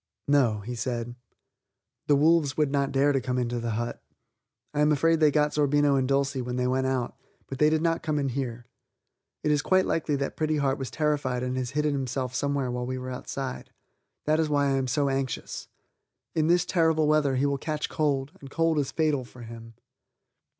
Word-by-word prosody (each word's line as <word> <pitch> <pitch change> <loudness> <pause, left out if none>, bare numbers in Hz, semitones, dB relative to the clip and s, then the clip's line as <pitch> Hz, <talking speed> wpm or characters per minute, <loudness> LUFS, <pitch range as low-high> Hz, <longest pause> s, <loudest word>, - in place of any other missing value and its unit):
"No," 125 -7 +3
he 120 +5 -6
said, 120 0 -3 0.9
"the 145 - +5
wolves 150 -1 +3
would 150 -3 +2
not 140 -1 +1
dare 135 0 +2
come 125 0 -2
into 120 -1 -1
the 115 0 -3
hut. 120 0 -4 0.7
I 145 - -2
am 150 +1 +4
afraid 165 +3 +3
they 155 -1 +5
got 150 0 +2
Zerbino 145 -1 +3
and 130 -1 +1
Dulcie 140 0 +1
when 125 0 -4
they 125 0 0
went 130 +1 +1
out, 130 -2 -1 0.3
but 135 - -7
they 150 - +5
did 155 0 +1
not 165 -1 +1
come 155 -2 -1
in 140 -2 0
here. 120 -2 -4 0.8
It 150 - +2
is 145 -1 +2
quite 185 +4 +3
likely 155 -2 0
that 140 0 -3
Pretty 155 -1 0
Heart 140 -2 0
was 135 - -4
terrified 145 -5 -1
and 125 0 -2
has 130 -1 -2
hidden 150 -1 +2
himself 130 -1 -2
somewhere 140 -2 -1
while 125 0 -3
we 130 0 -3
were 130 0 -5
outside; 130 +1 -5 0.6
that 155 +1 +2
is 160 -1 +1
why 145 -1 +2
I 135 - +2
am 130 -1 -1
so 140 +3 +1
anxious. 135 -2 -3 0.7
In 155 -1 +1
this 175 +1 +3
terrible 160 -4 +2
weather 150 -3 +3
he 130 +2 +1
will 140 -1 0
catch 150 0 -2
cold, 140 -2 -1
and 135 - -10
cold 165 +1 +1
is 140 - -1
fatal 155 -4 +1
for 120 0 -13
him." 115 0 -10
140 Hz, 205 wpm, -27 LUFS, 130-150 Hz, 0.9 s, the